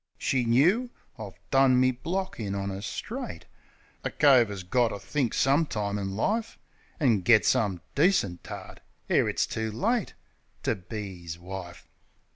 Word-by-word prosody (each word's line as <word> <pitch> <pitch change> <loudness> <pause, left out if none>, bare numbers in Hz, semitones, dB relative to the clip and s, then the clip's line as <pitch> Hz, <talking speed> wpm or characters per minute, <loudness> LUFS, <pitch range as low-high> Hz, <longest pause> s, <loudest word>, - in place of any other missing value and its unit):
She 125 -2 0
knoo. 175 - +3 0.3
I've 105 -3 -8
done 135 -1 +5
me 130 0 +4
block 185 +9 -4
in 100 -3 -3
on 100 0 -2
'er, 95 0 -5
straight. 85 -4 -6 0.6
A - - -1
cove 130 -6 +5
'as 100 -2 -6
got 120 +7 +2
to 105 - -4
think 130 +3 -1
some 145 +4 +3
time 105 -3 -2
in 95 -1 -4
life 220 - -1 0.4
An' 120 - +3
get 110 +4 +5
some 95 -6 +1
decent 140 - +2
tart, - - -9 0.3
ere - - +3
it's - - +1
too 110 0 -3
late, 215 - -1 0.5
To - - +1
be 95 -2 -7
'is 85 0 -6
wife. 90 -1 -8
110 Hz, 160 wpm, -27 LUFS, 95-140 Hz, 0.6 s, done